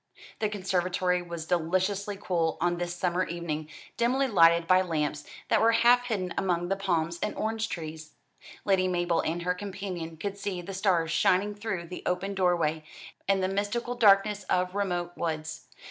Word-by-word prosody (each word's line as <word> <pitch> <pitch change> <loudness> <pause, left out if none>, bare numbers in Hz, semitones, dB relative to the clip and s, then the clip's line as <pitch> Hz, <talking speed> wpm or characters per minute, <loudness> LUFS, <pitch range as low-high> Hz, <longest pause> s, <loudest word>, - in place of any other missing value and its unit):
The 215 - +1
conservatory 185 -2 0
was 170 -2 -6
deliciously 185 +4 0
cool 170 -5 0
on 175 +1 +1
this 175 0 -3
summer 180 0 0
evening, 160 -3 -4 0.3
dimly 255 +3 +2
lighted 170 -6 +5
by 185 +2 +5
lamps 150 -4 -2 0.2
that - - +3
were 230 +1 +5
half 240 +2 +5
hidden 185 -6 -2
among 175 -2 0
the 195 - +2
palms 170 -3 -1
and 210 - -2
orange 220 0 -2
trees. 155 -2 -7 0.5
Lady 190 -2 +3
Mabel 175 -2 +1
and 170 +2 -2
her 180 +1 +1
companion 185 -4 -6
could 200 +4 -5
see 200 -2 -3
the 195 - -7
stars 185 -4 +1
shining 195 +2 +2
through 205 -4 -4
the 180 +2 -8
open 185 +2 -1
doorway, 170 -5 +1 0.4
and 195 -1 +2
the - - +2
mystical 205 +5 -2
darkness 210 -3 +4
of 180 0 0
remote 180 -3 -1
woods. 155 -4 -4
180 Hz, 165 wpm, -28 LUFS, 170-200 Hz, 0.5 s, lighted